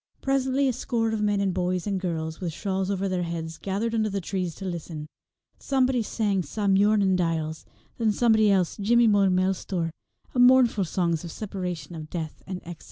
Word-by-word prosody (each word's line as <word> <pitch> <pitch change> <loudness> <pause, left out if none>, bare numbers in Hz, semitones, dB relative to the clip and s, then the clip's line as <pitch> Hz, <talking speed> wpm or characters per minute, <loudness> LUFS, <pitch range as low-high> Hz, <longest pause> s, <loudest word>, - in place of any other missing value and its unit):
Presently 270 0 +1
a 255 - +1
score 230 -2 -1
of 220 -1 -1
men 205 -1 +1
and 195 -2 +1
boys 180 -1 -1
and 200 -2 -1
girls, 160 -2 -3
with 175 -3 -2
shawls 190 +2 -2
over 195 0 -1
their 185 -1 -1
heads, 165 -1 -4
gathered 205 +4 -2
under 220 -1 +1
the 200 0 -2
trees 180 -3 -3
to 195 - -8
listen. 165 -4 -5 0.5
Somebody 260 -2 +1
sang 205 -3 0
Sa 200 +6 -4
Muirnin 200 0 +4
Diles, 160 -3 -1 0.3
and 230 - +1
then - - +5
somebody 220 -1 +4
else 185 -4 +2
Jimmy 235 +3 +4
Mo 205 -3 +4
Milestor, 185 -2 0 0.4
mournful 245 -5 +5
songs 170 -1 0
of 170 - -6
separation, 180 -7 -5
of 155 -2 -8
death, 160 -3 -5
and 185 -1 -5
of 175 - -10
exile. 175 - -7
195 Hz, 190 wpm, -26 LUFS, 175-215 Hz, 0.5 s, then